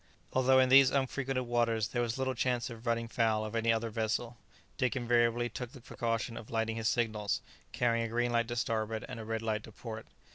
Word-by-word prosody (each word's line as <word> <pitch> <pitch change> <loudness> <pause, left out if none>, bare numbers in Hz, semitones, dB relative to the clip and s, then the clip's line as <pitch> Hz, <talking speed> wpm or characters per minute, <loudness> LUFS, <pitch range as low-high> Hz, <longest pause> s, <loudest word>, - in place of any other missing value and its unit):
Although 130 0 +4
in 130 -1 +5
these 135 0 +8
unfrequented 135 -1 -1
waters 115 -2 +1
there 120 - -1
was 120 0 -1
little 130 0 0
chance 125 0 -1
of 115 +1 -10
running 115 0 0
foul 110 -2 +1
of 110 +1 -6
any 115 0 +2
other 115 0 -1
vessel, 115 +2 -1 0.4
Dick 125 -5 0
invariably 120 -1 +2
took 120 +2 -6
the 135 - -10
precaution 115 0 -3
of 110 - -9
lighting 115 0 -1
his 110 -1 -1
signals, 110 -4 0 0.3
carrying 115 -1 +1
a - - -4
green 120 +1 0
light 115 -1 +1
to 120 - -3
starboard 110 -3 -1
and 125 -2 -7
a - - -5
red 110 0 -3
light 110 -1 -1
to - - -12
port. 110 0 -8
115 Hz, 215 wpm, -32 LUFS, 115-125 Hz, 0.4 s, these